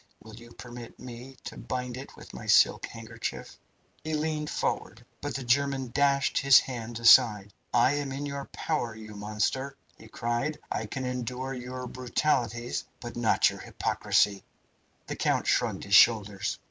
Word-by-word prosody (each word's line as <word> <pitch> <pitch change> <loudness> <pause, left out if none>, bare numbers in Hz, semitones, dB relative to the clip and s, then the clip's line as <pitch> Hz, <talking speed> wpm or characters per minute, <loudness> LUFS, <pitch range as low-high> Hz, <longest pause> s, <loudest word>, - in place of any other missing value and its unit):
Will 110 0 -13
you 115 +1 -13
permit 120 -1 -10
me 125 +2 -10
to - - -8
bind 125 -1 -4
it 130 +2 -9
with - - -13
my - - -8
silk - - +4
handkerchief?" 115 0 -6 0.5
He 155 0 -2
leaned 150 0 -2
forward, - - -3 0.2
but 145 0 -4
the 135 - -3
German 135 0 +1
dashed 140 0 +2
his 140 -1 +8
hand 120 -2 -6
aside. 110 -4 +6 0.2
"I 120 +3 +4
am 145 -2 -3
in 140 +2 -4
your 140 -1 -5
power, 120 -8 -3
you 110 -1 -10
monster!" 105 +7 -2 0.2
he 110 - -13
cried; 120 +7 -2
"I 110 - -2
can 130 +4 -4
endure 125 +1 -3
your 125 0 -6
brutalities, 120 -1 -1 0.2
but 120 -1 -8
not 120 -2 +3
your - - -9
hypocrisy." 100 -2 +1 0.6
The - - -5
count - - 0
shrugged - - +1
his 100 - -5
shoulders. 100 -3 +4
125 Hz, 160 wpm, -28 LUFS, 115-135 Hz, 0.6 s, his